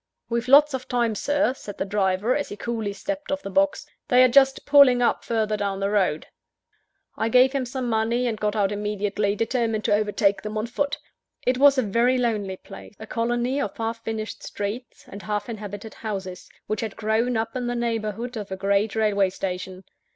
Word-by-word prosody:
"We've 235 Hz, 0 st, -1 dB
lots 290 Hz, +2 st, +6 dB
of 260 Hz, -1 st, -4 dB
time, 240 Hz, -2 st, +1 dB
Sir," 290 Hz, +4 st, +1 dB
said 205 Hz, -6 st, -10 dB
the -, -, -2 dB
driver, 200 Hz, +3 st, +1 dB
as 290 Hz, -, -2 dB
he 205 Hz, -, -7 dB
coolly 225 Hz, -2 st, -3 dB
stepped 290 Hz, +10 st, -5 dB
off 285 Hz, 0 st, -2 dB
the 195 Hz, -, -6 dB
box, 290 Hz, +6 st, +1 dB, 0.2 s
"they 250 Hz, 0 st, +6 dB
are -, -, +7 dB
just 270 Hz, +1 st, +4 dB
pulling 280 Hz, -4 st, +6 dB
up 245 Hz, -, +1 dB
further 220 Hz, -2 st, 0 dB
down 200 Hz, -2 st, -2 dB
the 200 Hz, +1 st, -1 dB
road." 185 Hz, -7 st, +1 dB, 0.9 s
I 225 Hz, -, -1 dB
gave 255 Hz, +2 st, +5 dB
him 270 Hz, -2 st, -2 dB
some 255 Hz, 0 st, -4 dB
money, 230 Hz, +2 st, +1 dB
and 225 Hz, -3 st, -2 dB
got 210 Hz, 0 st, -1 dB
out 200 Hz, -2 st, +1 dB
immediately 205 Hz, 0 st, -1 dB
determined 225 Hz, -1 st, -1 dB
to -, -, +3 dB
overtake 205 Hz, -1 st, +1 dB
them 215 Hz, 0 st, -5 dB
on 215 Hz, -, -1 dB
foot. 285 Hz, +4 st, -2 dB, 0.5 s
It 250 Hz, 0 st, +1 dB
was 280 Hz, 0 st, +6 dB
a 260 Hz, -, +3 dB
very 235 Hz, +5 st, +2 dB
lonely 210 Hz, -6 st, -1 dB
place 200 Hz, +2 st, -12 dB
a 220 Hz, -, -9 dB
colony 240 Hz, +4 st, -1 dB
of 200 Hz, -, -4 dB
half 230 Hz, 0 st, -3 dB
finished 220 Hz, -1 st, -5 dB
streets, 215 Hz, +5 st, -6 dB
and 200 Hz, -, -9 dB
half 210 Hz, +2 st, -3 dB
inhabited 210 Hz, -1 st, -7 dB
houses, 190 Hz, -4 st, -6 dB, 0.2 s
which 215 Hz, 0 st, -2 dB
had 220 Hz, -3 st, -4 dB
grown 225 Hz, +2 st, 0 dB
up 225 Hz, +2 st, -3 dB
in 250 Hz, -1 st, -2 dB
the 245 Hz, -, -2 dB
neighbourhood 230 Hz, 0 st, -3 dB
of 205 Hz, -2 st, -6 dB
a 190 Hz, -, -3 dB
great 200 Hz, +2 st, +1 dB
railway 205 Hz, -3 st, +2 dB
station. 185 Hz, 0 st, -5 dB
220 Hz, 200 wpm, -24 LUFS, 205-245 Hz, 0.9 s, are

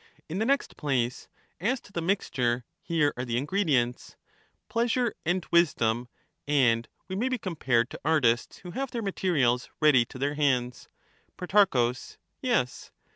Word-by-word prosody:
In 170 Hz, +5 st, -4 dB
the 220 Hz, -, 0 dB
next 275 Hz, 0 st, 0 dB
place, 125 Hz, -4 st, -1 dB, 0.3 s
as 240 Hz, +9 st, 0 dB
to -, -, -18 dB
the 170 Hz, -, -3 dB
mixture, 125 Hz, -, 0 dB, 0.2 s
here 155 Hz, -4 st, +1 dB
are 125 Hz, -, -2 dB
the 120 Hz, -2 st, -2 dB
ingredients, 140 Hz, -5 st, 0 dB, 0.5 s
pleasure 235 Hz, +1 st, +1 dB
and 175 Hz, 0 st, +1 dB
wisdom, 125 Hz, -8 st, +2 dB, 0.4 s
and 120 Hz, -6 st, +3 dB, 0.2 s
we 190 Hz, -, -4 dB
may 240 Hz, +7 st, 0 dB
be 255 Hz, -, 0 dB
com 185 Hz, -6 st, -5 dB
pared 120 Hz, -5 st, +1 dB
to -, -, -8 dB
artists 130 Hz, -6 st, +2 dB
who 180 Hz, -, -10 dB
have 270 Hz, +8 st, -3 dB
their 235 Hz, -3 st, -4 dB
materials 150 Hz, -11 st, +1 dB
ready 150 Hz, -6 st, +5 dB
to 125 Hz, -, -11 dB
their 140 Hz, +2 st, -1 dB
hands. 130 Hz, -5 st, 0 dB, 0.5 s
Pro. 180 Hz, -, +3 dB, 0.5 s
Yes. 240 Hz, -, -1 dB
150 Hz, 150 wpm, -28 LUFS, 125-195 Hz, 0.5 s, ready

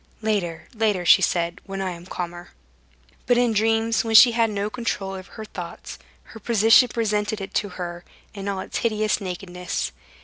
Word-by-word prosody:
"Later, 195 Hz, -7 st, -2 dB
later," 210 Hz, -5 st, 0 dB
she -, -, +7 dB
said—"when 175 Hz, +3 st, -2 dB
I 190 Hz, -1 st, -2 dB
am 175 Hz, 0 st, -10 dB
calmer." 175 Hz, -1 st, -6 dB, 0.7 s
But 245 Hz, 0 st, +4 dB
in 240 Hz, -2 st, +2 dB
dreams, 225 Hz, +1 st, +2 dB
when 225 Hz, -1 st, -1 dB
she 225 Hz, +3 st, +10 dB
had 230 Hz, -1 st, +2 dB
no 205 Hz, -1 st, -2 dB
control 215 Hz, -4 st, -3 dB
over 190 Hz, 0 st, -9 dB
her 220 Hz, -, -8 dB
thoughts, -, -, -8 dB, 0.2 s
her 225 Hz, -, -13 dB
position 225 Hz, +3 st, +5 dB
presented 215 Hz, -2 st, -1 dB
itself 195 Hz, -, -7 dB
to 205 Hz, -, 0 dB
her 175 Hz, -1 st, -6 dB, 0.3 s
in 200 Hz, -1 st, -7 dB
all 195 Hz, -1 st, -2 dB
its -, -, -4 dB
hideous 215 Hz, -2 st, 0 dB
nakedness. 180 Hz, -1 st, -4 dB
205 Hz, 170 wpm, -23 LUFS, 185-225 Hz, 0.7 s, she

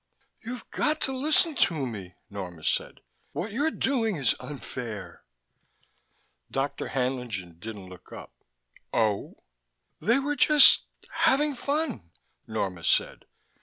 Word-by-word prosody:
"You've 245 Hz, +2 st, -6 dB
got 310 Hz, +1 st, +1 dB
to -, -, +1 dB
listen 305 Hz, +4 st, +3 dB
to 160 Hz, -, +2 dB
me," 100 Hz, -7 st, -7 dB
Norma 90 Hz, -5 st, -7 dB
said. -, -, -1 dB, 0.3 s
"What 205 Hz, +4 st, -3 dB
you're 285 Hz, +9 st, +1 dB
doing 240 Hz, -9 st, 0 dB
is 135 Hz, -7 st, +2 dB
unfair." 115 Hz, -10 st, -7 dB, 1.3 s
Dr. 135 Hz, +1 st, -2 dB
Haenlingen 125 Hz, -, -3 dB
didn't 105 Hz, -1 st, -7 dB
look 90 Hz, -1 st, -13 dB
up. -, -, -10 dB, 0.6 s
"Oh?" 105 Hz, -3 st, 0 dB, 0.6 s
"They 235 Hz, +5 st, +3 dB
were 290 Hz, +2 st, 0 dB
just 295 Hz, -1 st, +7 dB, 0.3 s
having 300 Hz, -3 st, +3 dB
fun," 280 Hz, -, -2 dB, 0.4 s
Norma 95 Hz, -6 st, -3 dB
said. -, -, +1 dB
135 Hz, 115 wpm, -27 LUFS, -, 1.3 s, just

